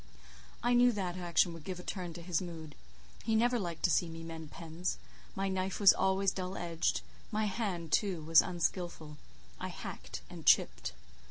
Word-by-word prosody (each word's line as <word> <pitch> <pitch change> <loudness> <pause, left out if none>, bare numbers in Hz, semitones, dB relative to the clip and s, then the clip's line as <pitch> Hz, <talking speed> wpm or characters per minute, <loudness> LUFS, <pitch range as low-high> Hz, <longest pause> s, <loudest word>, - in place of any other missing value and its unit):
I 240 +1 +3
knew 245 0 +6
that 185 -4 -2
action 175 -1 +2
would 165 -2 -10
give 180 +2 -5
a - - -8
turn 180 -3 -4
to 170 - -8
his 175 -1 0
mood. 165 -4 -7 0.5
He 225 - +1
never 240 +2 +3
liked 170 -5 -4
to 175 - +4
see 175 - +2
me 165 0 -7
mend 165 -2 -7
pens; 165 +3 -4 0.4
my 195 0 0
knife 190 0 -1
was 200 -2 +9
always 190 0 +2
dull 185 0 -4
edged—my 175 +5 -2
hand, 190 -6 -2
too, 190 -7 +1
was 160 +1 +7
unskilful; 170 -3 -2 0.4
I - - -3
hacked - - -7
and - - -9
chipped. - - +4
180 Hz, 175 wpm, -33 LUFS, 165-195 Hz, 0.5 s, was